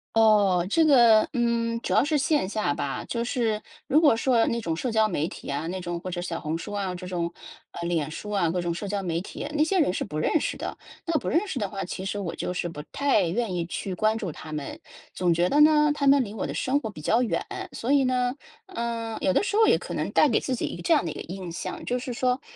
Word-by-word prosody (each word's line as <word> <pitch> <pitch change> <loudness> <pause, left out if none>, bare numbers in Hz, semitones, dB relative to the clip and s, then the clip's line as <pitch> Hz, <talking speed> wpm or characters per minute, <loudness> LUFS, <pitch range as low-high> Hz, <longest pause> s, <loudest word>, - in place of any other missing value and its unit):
哦， 205 -5 +4
这 325 +9 +4
个 240 -7 +6
嗯， 235 -1 0
主 - - -2
要 - - +5
是 300 0 +1
线 275 -7 +1
下 210 -9 0
吧， 140 -1 -3
就 235 -1 -2
是， 230 -3 -1 0.2
如 295 +3 +4
果 290 -8 +5
说 235 -1 +3
那 235 - 0
种 165 -4 -2
社 245 +9 -2
交 220 -1 +3
媒 170 -5 -1
体 - - -10
啊， 145 +4 -2
那 185 +2 -3
种 175 -1 -4
或 185 +1 -6
者 175 - -4
小 170 -2 -4
红 155 +2 -3
书 170 - -7
啊， 195 -3 -2
这 180 +1 -8
种， 170 -2 -2 0.4
呃， 170 0 -5
脸 160 -4 0
书 210 +6 -7
啊， 185 -5 +1
各 180 +2 -1
种 175 -1 -1
社 200 +4 -5
交 200 -1 -2
媒 170 -1 -1
体， 200 - -6
那 300 - +3
些 370 +4 +1
人 235 - +2
是 - - -2
不 150 - -6
认 295 - +2
识 - - -2
的， - - -5 0.3
那 335 - -1
不 - - -3
认 355 +7 +1
识 275 -9 -3
的 205 - -2
话， 195 -1 -4
其 185 - -6
实 195 +2 -3
我 185 -5 -3
就 - - -3
是 180 -1 -2
不 150 -3 -7
太 280 -8 +2
愿 215 +3 -1
意 175 -1 -1
去 190 +1 -4
关 215 +4 +1
注 190 -7 -4
她 155 - -10
们。 150 -2 -5 0.3
总 180 -2 +1
觉 175 +2 +2
得 295 +1 +4
呢， 300 -1 +6
她 280 -1 -1
们 275 -1 +6
离 205 - -8
我 - - -3
的 - - -4
生 270 +3 +1
活 220 - -5
比 185 - -10
较 225 +10 +2
远， 240 - -1 0.3
所 240 - -2
以 280 -1 +5
呢， 250 -1 +1 0.3
呃， 235 - -4
有 185 - +2
的 - - +2
时 410 - -2
候 445 0 +5
也 - - +5
可 - - -7
能 - - -2
带 305 - +5
给 235 - +3
自 260 - -2
己 - - -2
一 - - -4
个 - - -8
这 170 - +3
样 175 - +1
的 160 - -2
一 - - -5
个 - - -7
印 185 0 -7
象， 170 - -6
就 250 0 -1
是 250 - -5
说 250 +1 0
215 Hz, 295 characters per minute, -26 LUFS, 175-255 Hz, 0.4 s, 个